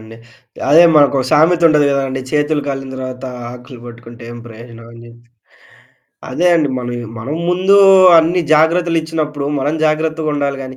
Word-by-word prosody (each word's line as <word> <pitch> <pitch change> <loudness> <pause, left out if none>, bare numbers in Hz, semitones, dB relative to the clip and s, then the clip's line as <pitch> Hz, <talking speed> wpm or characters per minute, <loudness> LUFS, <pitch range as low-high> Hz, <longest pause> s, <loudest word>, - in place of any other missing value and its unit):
కదండీ. 110 +1 -14 0.5
అదే 165 +3 +6
మనకో 145 -2 +3
సామెత 165 +3 +2
ఉంటది 150 -2 +2
కదండీ. 135 -1 -3
'చేతులు 150 0 -1
కాలిన 135 -1 -6
తర్వాత 130 0 -8 0.3
ఆకులు 125 +1 -13
పట్టుకుంటే 120 0 -13
ఏం 120 - -10
ప్రయోజనం' 115 0 -13
అని 115 - -14
జెప్పి. 120 0 -18 1.0
అదే 175 - -1
అండి 155 -3 0
మనం, 120 -1 -6 0.2
మనం 130 +7 -6 0.2
ముందు 185 +2 +1 0.4
అన్ని 165 +3 +1
జాగ్రత్తలు 165 +2 +1
ఇచ్చినప్పుడు, 150 -3 -5
మనం 145 +3 -2
జాగ్రత్తగుండాలి 155 -2 -2
గానీ 130 0 -10
145 Hz, 145 wpm, -15 LUFS, 125-155 Hz, 1.0 s, అదే